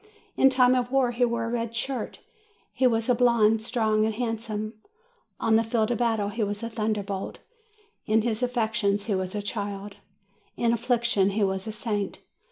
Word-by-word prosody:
In 270 Hz, -, +6 dB
time 255 Hz, -1 st, +4 dB
of 250 Hz, -1 st, 0 dB
war 265 Hz, -3 st, +3 dB
he 240 Hz, +1 st, 0 dB
wore 235 Hz, -1 st, -1 dB
a -, -, -3 dB
red 230 Hz, -1 st, -3 dB
shirt. 250 Hz, 0 st, -3 dB, 0.6 s
He 260 Hz, -, +3 dB
was 225 Hz, -2 st, +1 dB
a 250 Hz, -, +4 dB
blonde, 230 Hz, -3 st, +3 dB
strong 220 Hz, -2 st, +1 dB
and 220 Hz, 0 st, 0 dB
handsome. 225 Hz, -2 st, -3 dB, 0.7 s
On 220 Hz, -1 st, +3 dB
the 225 Hz, -, +2 dB
field 225 Hz, 0 st, 0 dB
of 240 Hz, -, -1 dB
battle 225 Hz, -4 st, +1 dB
he 220 Hz, +2 st, -2 dB
was 205 Hz, +1 st, -3 dB
a 230 Hz, -, -4 dB
thunder 215 Hz, -2 st, -1 dB
bolt; 195 Hz, -1 st, -5 dB, 0.7 s
in 215 Hz, 0 st, +3 dB
his 225 Hz, 0 st, -1 dB
affections 220 Hz, -5 st, 0 dB
he 210 Hz, -, -1 dB
was 185 Hz, 0 st, -2 dB
a 205 Hz, -, -2 dB
child, 205 Hz, -1 st, -5 dB, 0.6 s
in 235 Hz, -1 st, +2 dB
affliction 235 Hz, -4 st, +2 dB
he 205 Hz, +1 st, 0 dB
was 190 Hz, +1 st, -1 dB
a -, -, -2 dB
saint. 210 Hz, -2 st, -2 dB
225 Hz, 185 wpm, -26 LUFS, 210-235 Hz, 0.7 s, In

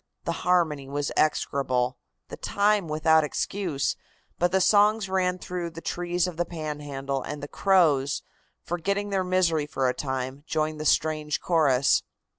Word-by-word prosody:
The -, -, -1 dB
harmony 160 Hz, -6 st, +1 dB
was 145 Hz, +1 st, -2 dB
execrable, 130 Hz, -4 st, +1 dB, 0.3 s
the -, -, -6 dB
time 205 Hz, -2 st, +1 dB
without 155 Hz, +1 st, +3 dB
excuse, 155 Hz, -1 st, -2 dB, 0.4 s
but 175 Hz, 0 st, +2 dB
the 190 Hz, -, +3 dB
songs 210 Hz, +1 st, +4 dB
ran 185 Hz, -1 st, 0 dB
through 180 Hz, -1 st, -4 dB
the 165 Hz, 0 st, -9 dB
trees 175 Hz, +1 st, -1 dB
of 180 Hz, -3 st, -5 dB
the 175 Hz, -, +2 dB
Panhandle, 145 Hz, -4 st, -4 dB
and 145 Hz, +3 st, -6 dB
the -, -, -4 dB
crows, 150 Hz, -8 st, +2 dB, 0.4 s
forgetting 200 Hz, +4 st, -2 dB
their 190 Hz, -1 st, +1 dB
misery 175 Hz, -5 st, +1 dB
for 135 Hz, -3 st, 0 dB
a 125 Hz, -, +1 dB
time, 130 Hz, +1 st, -4 dB
joined 155 Hz, -1 st, -1 dB
the -, -, -4 dB
strange 155 Hz, 0 st, +1 dB
chorus. 140 Hz, -6 st, +3 dB
160 Hz, 150 wpm, -26 LUFS, 145-180 Hz, 0.4 s, songs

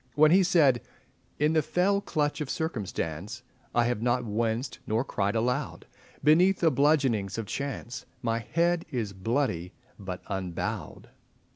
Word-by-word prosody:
When 155 Hz, +1 st, +6 dB
he 190 Hz, +3 st, +6 dB
said— 155 Hz, -, +4 dB, 0.6 s
"In 150 Hz, +2 st, +2 dB
the 160 Hz, -, +4 dB
fell 195 Hz, +6 st, +1 dB
clutch 150 Hz, -5 st, -1 dB
of 145 Hz, -, -3 dB
Circumstance 105 Hz, -, -3 dB, 0.3 s
I 120 Hz, -, +4 dB
have 120 Hz, -2 st, -1 dB
not 125 Hz, +1 st, +1 dB
winced 115 Hz, +4 st, -2 dB
nor 110 Hz, +3 st, +1 dB
cried 100 Hz, -3 st, -1 dB
aloud, 125 Hz, +5 st, -1 dB, 0.4 s
Beneath 175 Hz, +6 st, +5 dB
the 165 Hz, -2 st, +4 dB
bludgeonings 135 Hz, -9 st, +2 dB
of 115 Hz, -, -3 dB
Chance 135 Hz, 0 st, -5 dB, 0.2 s
My 115 Hz, -1 st, 0 dB
head 170 Hz, +7 st, +1 dB
is 110 Hz, -6 st, -3 dB
bloody 95 Hz, -4 st, -1 dB, 0.3 s
but 95 Hz, -2 st, -6 dB
unbowed." 95 Hz, -3 st, -4 dB
125 Hz, 140 wpm, -28 LUFS, 105-155 Hz, 0.6 s, When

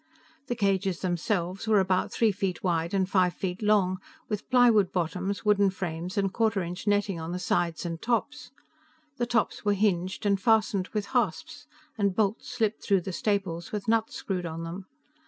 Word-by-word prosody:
The 245 Hz, -, -1 dB
cages 195 Hz, -3 st, 0 dB
themselves 185 Hz, +2 st, -1 dB
were 215 Hz, -2 st, +5 dB
about 185 Hz, -1 st, +1 dB
three 225 Hz, -2 st, +3 dB
feet 190 Hz, -3 st, -3 dB
wide 170 Hz, -2 st, 0 dB
and 190 Hz, -2 st, +1 dB
five 185 Hz, -2 st, +2 dB
feet 185 Hz, 0 st, -4 dB
long, 200 Hz, -3 st, +2 dB, 0.3 s
with 210 Hz, -2 st, -4 dB
plywood 235 Hz, -6 st, +5 dB
bottoms, 185 Hz, +4 st, -2 dB
wooden 205 Hz, -1 st, +4 dB
frames 180 Hz, 0 st, -5 dB
and 195 Hz, -1 st, +1 dB
quarter 220 Hz, -4 st, +1 dB
inch 180 Hz, +4 st, -6 dB
netting 205 Hz, -3 st, +1 dB
on 165 Hz, +2 st, -5 dB
the -, -, -2 dB
sides 175 Hz, -2 st, -1 dB
and 165 Hz, -1 st, -4 dB
tops. 245 Hz, +3 st, -1 dB, 0.7 s
The 240 Hz, -, -1 dB
tops 240 Hz, -2 st, 0 dB
were 205 Hz, -1 st, +2 dB
hinged, 190 Hz, 0 st, 0 dB
and 200 Hz, -1 st, +2 dB
fastened 215 Hz, -3 st, +2 dB
with 210 Hz, -2 st, -3 dB
hasps, 200 Hz, -11 st, -1 dB, 0.3 s
and 200 Hz, -2 st, +1 dB
bolts 215 Hz, +3 st, 0 dB
slipped 225 Hz, -3 st, -1 dB
through 195 Hz, -3 st, +2 dB
the 185 Hz, +2 st, -5 dB
staples 190 Hz, -4 st, -1 dB
with 210 Hz, -1 st, -4 dB
nuts 225 Hz, 0 st, +1 dB
screwed 180 Hz, -3 st, -3 dB
on 165 Hz, 0 st, -5 dB
them. 180 Hz, +3 st, -7 dB
195 Hz, 175 wpm, -28 LUFS, 180-215 Hz, 0.7 s, were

